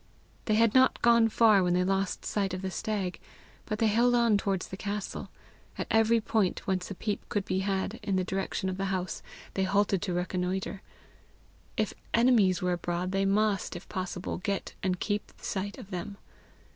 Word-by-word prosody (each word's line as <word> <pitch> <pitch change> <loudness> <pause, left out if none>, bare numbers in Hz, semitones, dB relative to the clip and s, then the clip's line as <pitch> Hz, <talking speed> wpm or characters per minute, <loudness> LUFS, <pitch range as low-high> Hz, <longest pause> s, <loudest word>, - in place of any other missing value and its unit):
They 215 - +2
had 225 0 +4
not 260 0 +4
gone 235 -1 +6
far 215 -3 +5
when 180 -1 +2
they 180 - +3
lost 195 0 -1
sight 195 -3 -1
of 185 - -6
the 190 - -2
stag, 195 -2 -2 0.5
but 215 - -2
they 225 - +2
held 235 +3 +4
on 235 -3 +4
towards 195 -2 -1
the - - -5
castle. 205 +1 -4 0.5
At - - -2
every 225 +1 +4
point 215 -3 0
whence 185 -2 -1
a 200 - -5
peep 210 +2 -3
could 205 -2 -1
be 185 0 0
had 195 +2 -1
in 200 -2 -1
the 185 - +2
direction 190 +1 -2
of 185 0 -2
the 195 - -1
house, 185 -1 -2 0.3
they 195 - -1
halted 200 -1 +2
to 185 - -2
reconnoitre: 185 +2 -2 1.0
if 215 -2 0 0.2
enemies 225 -7 +4
were 180 0 +2
abroad, 175 +1 -2
they 195 0 +1
must, 200 -1 +1
if 175 - -8
possible, 185 -1 -4
get 200 +1 -3
and 185 -2 0
keep 205 0 -2
sight 200 +1 -4
of 215 -6 -11
them. 190 +3 -5
195 Hz, 185 wpm, -29 LUFS, 185-215 Hz, 1.0 s, gone